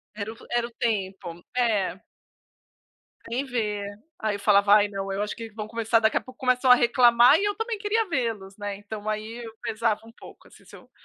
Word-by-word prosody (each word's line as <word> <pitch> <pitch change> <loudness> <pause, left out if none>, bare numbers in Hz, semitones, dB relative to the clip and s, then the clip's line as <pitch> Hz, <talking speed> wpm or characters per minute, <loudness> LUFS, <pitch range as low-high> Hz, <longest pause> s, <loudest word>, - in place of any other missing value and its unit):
Era 215 +1 -5
o - - -19
era 240 0 0
o - - -16
tempo, 190 -7 -3
é. 210 -6 +1 1.3
Sem 250 +4 -3
ver. 210 -5 -2 0.3
Aí 215 -2 -1
eu - - -6
falava: 200 0 +4
"Ai, 205 -1 +4
não, 195 -1 -5
eu 195 +1 -2
acho 210 - -3
que 230 -1 -8
vão 215 0 -6
começar 230 0 +1
daqui 220 0 +2
a - - 0
pouco", 255 0 -15
começam 255 0 +2
a - - +10
reclamar 240 +3 +5
e 410 - 0
eu 410 - 0
também 450 +1 -3
queria 420 +1 0
vê-los, 225 - -3
né? 205 -1 -4
Então, 205 +1 -8
aí 220 +3 -4
eu 225 -1 -9
pesava 220 -1 -1
um 230 - -14
pouco, - - -15
assim, - - -19
se - - -14
eu - - -16
225 Hz, 210 wpm, -25 LUFS, 205-240 Hz, 1.3 s, a